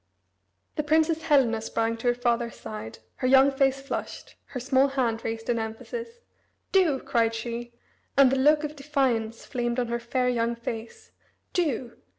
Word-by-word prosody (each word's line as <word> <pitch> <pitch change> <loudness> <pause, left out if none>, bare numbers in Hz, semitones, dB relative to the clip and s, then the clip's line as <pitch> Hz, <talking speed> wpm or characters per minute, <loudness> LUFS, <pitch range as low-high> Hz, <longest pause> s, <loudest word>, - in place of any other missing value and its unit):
The 300 - +1
Princess 315 +2 +2
Helena 270 -8 +3
sprang 225 +1 -1
to 230 - -3
her 240 - +3
father's 240 -1 0
side, 110 0 -7 0.2
her 255 - 0
young 270 +1 +6
face 270 0 +2
flushed, 275 - -5
her 255 - -6
small 265 +2 +3
hand 245 -5 -1
raised 225 0 -4
in 235 -1 +1
emphasis. 460 - -6 0.5
"Do!" 345 -8 +3
cried 230 -2 +1
she, 235 +1 -5 0.5
and 275 -2 +7
the - - +2
look 300 +3 +4
of 300 0 -4
defiance 265 -6 -1
flamed 240 -2 -2
on 240 -1 -1
her 235 0 -1
fair 250 +2 -1
young 235 -1 +1
face. 230 -1 -7 0.4
"Do! 270 - -1
250 Hz, 165 wpm, -26 LUFS, 230-280 Hz, 0.5 s, and